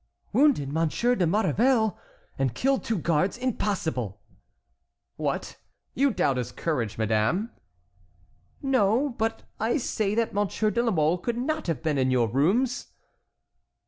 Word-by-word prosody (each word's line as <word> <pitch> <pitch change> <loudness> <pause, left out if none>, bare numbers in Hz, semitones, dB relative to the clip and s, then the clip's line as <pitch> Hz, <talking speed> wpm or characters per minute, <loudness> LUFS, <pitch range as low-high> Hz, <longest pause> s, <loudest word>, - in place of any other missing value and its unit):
"Wounded 260 - +3
Monsieur 165 +10 +1
de 185 -8 +1
Maurevel 220 +3 +2 0.4
and 130 -4 0
killed 270 +1 +1
two 225 - -1
guards!—impossible!" 170 - -1 1.0
"What! - - -3 0.4
You 280 +2 +3
doubt 140 - +1
his 125 -1 -3
courage, 120 -8 -2
madame?" 110 - +1 1.1
"No, 260 0 +2
but 225 -2 -2 0.2
I 225 +6 +1
say 215 -6 -1
that 230 0 0
Monsieur 205 +1 0
de 235 - +1
la 240 - +1
Mole 160 0 +2
could 235 +5 -2
not 310 +3 -2
have 165 -1 -2
been 150 -3 0
in 130 0 +2
your 125 -3 +2
rooms." 205 - +1
200 Hz, 130 wpm, -26 LUFS, 145-240 Hz, 1.1 s, Wounded